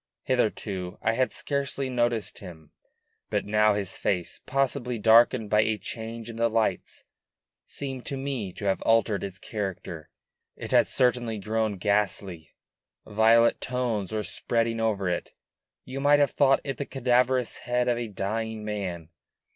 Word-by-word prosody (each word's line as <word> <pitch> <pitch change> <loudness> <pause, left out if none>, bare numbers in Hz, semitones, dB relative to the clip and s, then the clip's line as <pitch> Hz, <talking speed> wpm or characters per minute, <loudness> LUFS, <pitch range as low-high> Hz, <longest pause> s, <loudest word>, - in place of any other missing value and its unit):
Hitherto 105 -7 -1
I 115 - +2
had 130 +2 +1
scarcely 140 -1 -2
noticed 120 -3 -1
him, 80 -6 -12 0.6
but - - -1
now 105 0 +3
his 100 -3 -3
face, 90 -4 -2
possibly 130 -2 0
darkened 110 0 +5
by 105 - +4
a 110 0 0
change 115 +1 -7
in 115 -1 -7
the 115 0 +2
lights, 110 0 -1 0.6
seemed 135 -3 -5
to 140 - -3
me 135 -8 -3
to 100 - -7
have 95 -1 +1
altered 115 -3 +2
its 95 -1 -6
character; 95 -6 -5 0.5
it - - -7
had - - +5
certainly 120 -3 +1
grown 110 0 -1
ghastly; 95 -4 -1 0.5
violet 110 +2 +4
tones 120 -6 -2
were 110 -1 -1
spreading 115 0 -1
over 105 -4 0
it; 90 -1 -2 0.5
you 130 +1 -5
might 145 +1 +5
have 145 -1 +3
thought 135 -1 +4
it 135 -3 -4
the 140 - -3
cadaverous 125 -1 +1
head 125 0 -1
of 120 -1 +1
a 120 - -3
dying 110 +2 -3
man. 95 -6 -4
115 Hz, 150 wpm, -27 LUFS, 100-125 Hz, 0.6 s, darkened